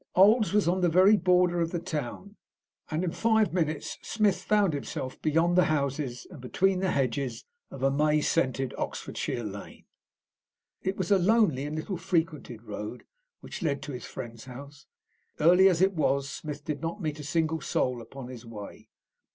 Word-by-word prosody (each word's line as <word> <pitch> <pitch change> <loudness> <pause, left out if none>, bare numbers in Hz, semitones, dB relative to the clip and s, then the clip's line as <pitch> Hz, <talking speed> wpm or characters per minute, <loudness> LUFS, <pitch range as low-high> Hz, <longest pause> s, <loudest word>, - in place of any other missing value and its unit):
Old's 210 +4 +5
was 205 -3 +2
on 185 +2 +2
the 175 - +4
very 185 +5 +6
border 180 -3 +3
of 165 - 0
the 175 - -2
town, 170 - -5 0.5
and 155 +3 -1
in 175 - -1
five 220 0 +2
minutes 155 -4 -2
Smith 205 -4 +1
found 205 -3 +2
himself 130 -2 -5
beyond 165 +3 +2
the 180 - +5
houses 140 -4 -1
and 155 -8 -10
between 185 +9 +1
the 190 0 0
hedges 135 -3 -1 0.2
of 130 - -8
a 135 - +4
May 150 +2 +3
scented 135 -4 0
Oxfordshire 120 - -3
lane. 100 -1 -8 1.0
It 190 +1 -2
was 185 0 -2
a 200 - +6
lonely 185 - +3
and 150 - -4
little 175 +4 -3
frequented 160 - -2
road 105 +2 -6 0.4
which - - -8
led 145 -5 -1
to 145 - -6
his 125 -2 -6
friend's 115 -2 -8
house. 140 +2 -11 0.5
Early 180 +5 +6
as 180 0 +2
it 195 +1 +3
was, 140 -4 +1
Smith 150 0 -7
did 150 -2 -3
not 165 +5 -3
meet 155 -4 -3
a - - -6
single 160 +2 0
soul 125 -2 -1
upon 130 +2 -9
his 125 -2 -9
way. 110 -4 -10
155 Hz, 175 wpm, -28 LUFS, 135-185 Hz, 1.0 s, very